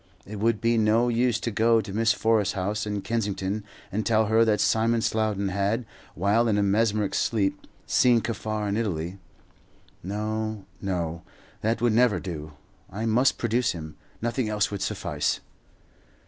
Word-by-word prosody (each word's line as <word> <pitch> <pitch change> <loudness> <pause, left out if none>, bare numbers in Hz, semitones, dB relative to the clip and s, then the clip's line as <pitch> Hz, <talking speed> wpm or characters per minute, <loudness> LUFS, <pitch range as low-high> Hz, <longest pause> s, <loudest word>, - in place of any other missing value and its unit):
It 105 0 -7
would 115 0 +2
be 115 0 +2
no 110 +3 +3
use 120 -1 +1
to 115 - -2
go 115 +2 +3
to 100 -3 -5
Miss 115 +2 +3
Forrest's 110 -4 +1
house 105 +3 -2
in 105 -1 -3
Kensington 105 -2 -2 0.3
and 110 +3 -1
tell 110 -1 +3
her 110 +2 +4
that 110 -2 +2
Simon 115 +1 +2
Slowden 105 -3 0
had, 100 +5 0 0.3
while 105 +6 +2
in 105 -2 +2
a 105 - +2
mesmeric 105 0 +1
sleep, 100 -4 0 0.2
seen 120 -2 +4
Kaffar 110 -2 -3
in 100 +1 -1
Italy. 90 -4 -2 0.8
No, 110 +1 -3 0.2
no; 85 -4 -2 0.4
that 115 +2 0
would 120 -2 +3
never 120 -1 +4
do. 75 -5 -6 0.4
I 105 +4 -4
must 120 +4 +3
produce 120 +2 +1
him, 80 -2 -8 0.3
nothing 120 -1 -1
else 105 -1 0
would 100 - -4
suffice. - - -1
110 Hz, 160 wpm, -26 LUFS, 100-115 Hz, 0.8 s, her